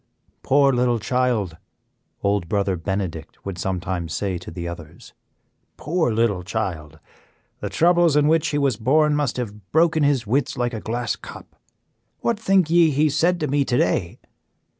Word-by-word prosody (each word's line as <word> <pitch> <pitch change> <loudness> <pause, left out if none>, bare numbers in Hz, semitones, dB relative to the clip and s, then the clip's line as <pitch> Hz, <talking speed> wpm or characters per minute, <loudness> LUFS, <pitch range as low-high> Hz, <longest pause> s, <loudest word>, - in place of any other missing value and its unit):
"Poor 140 0 +3
little 120 -1 +2
child!" 115 -7 -1 0.7
Old 100 -4 0
Brother 100 -2 0
Benedict 85 -3 -5
would 95 -3 -5
sometimes 90 -3 -3
say 95 -3 -2
to 90 - -10
the 85 0 -6
others, 85 -1 -10 0.6
"poor 160 -4 0
little 110 -4 +1
child! 90 -7 -4 0.6
The - - -4
troubles 175 -2 +3
in 150 0 +4
which 160 0 +3
he 145 - -1
was 135 -6 +1
born 150 +6 +3
must 145 -4 -1
have 105 -5 -6
broken 160 0 +3
his 140 -5 +2
wits 135 +6 0
like 120 0 -1
a 110 - -5
glass 120 +2 -2
cup. - - -12 0.7
What 235 -3 0
think 195 -5 +3
ye 170 -1 +5
he 150 +1 +2
said 170 +4 +2
to 150 - 0
me 140 +1 +1
to 120 - 0
day? 90 -4 0
120 Hz, 160 wpm, -22 LUFS, 95-150 Hz, 0.7 s, ye